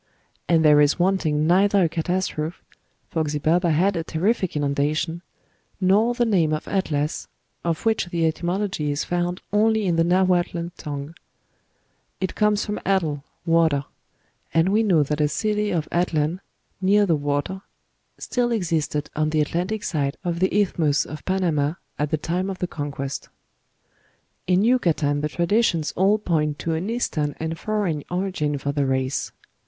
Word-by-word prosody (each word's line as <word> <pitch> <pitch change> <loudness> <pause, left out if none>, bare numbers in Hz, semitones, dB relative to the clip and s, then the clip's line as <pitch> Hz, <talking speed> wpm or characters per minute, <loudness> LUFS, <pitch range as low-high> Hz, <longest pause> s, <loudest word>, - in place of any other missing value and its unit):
And 165 -2 +4
there 150 -1 +7
is 145 0 +3
wanting 175 -5 +1
neither 195 +3 +4
a - - +4
catastrophe 165 -1 -2 0.5
for 160 - 0
Xibalba 155 +4 +1
had 185 +5 +2
a 165 - -1
terrific 185 +3 0
inundation 150 +3 0 0.6
nor 205 +6 +3
the 240 -1 +2
name 175 -8 +2
of 155 - -3
Atlas, 150 -6 -1 0.4
of 170 +2 -2
which 220 -5 +1
the 170 -1 0
etymology 175 0 -1
is 145 +1 -1
found 175 +1 -2
only 220 0 +3
in 175 -3 +1
the 165 - +4
Nahuatl 175 -1 +1
tongue: 145 +1 -6 1.1
it 190 0 -2
comes 210 -1 +2
from 210 -1 -3
atl, 165 -7 0 0.2
water; 160 -4 +3 0.7
and 165 +3 +4
we 210 +3 +3
know 180 -9 +3
that 150 +2 -2
a 150 - +4
city 210 +7 -1
of 170 -6 -1
Atlan 170 -1 0 0.4
(near 205 +2 +4
the 170 -4 +2
water) 145 +6 -2 0.6
still 245 -1 -1
existed 160 -8 -1
on 155 0 +1
the 155 0 0
Atlantic 180 +8 -2
side 140 -4 -1
of 170 -2 -2
the 185 - +2
Isthmus 160 -7 +1
of 150 -1 -8
Panama 165 -6 +1 0.3
at 150 0 0
the 155 - +1
time 175 +5 -2
of 190 - -4
the 180 - -1
Conquest." 145 -4 -5 1.2
"In 185 +2 +3
Yucatan 165 - +2
the 150 - -1
traditions 175 -1 +1
all 195 +3 +3
point 155 -7 0
to 165 - -2
an 170 +6 -2
Eastern 155 -11 -1
and 160 +1 -3
foreign 200 -9 -1
origin 180 -5 -1
for 140 +1 -2
the 140 -1 0
race. 130 0 -1
170 Hz, 155 wpm, -23 LUFS, 150-190 Hz, 1.2 s, there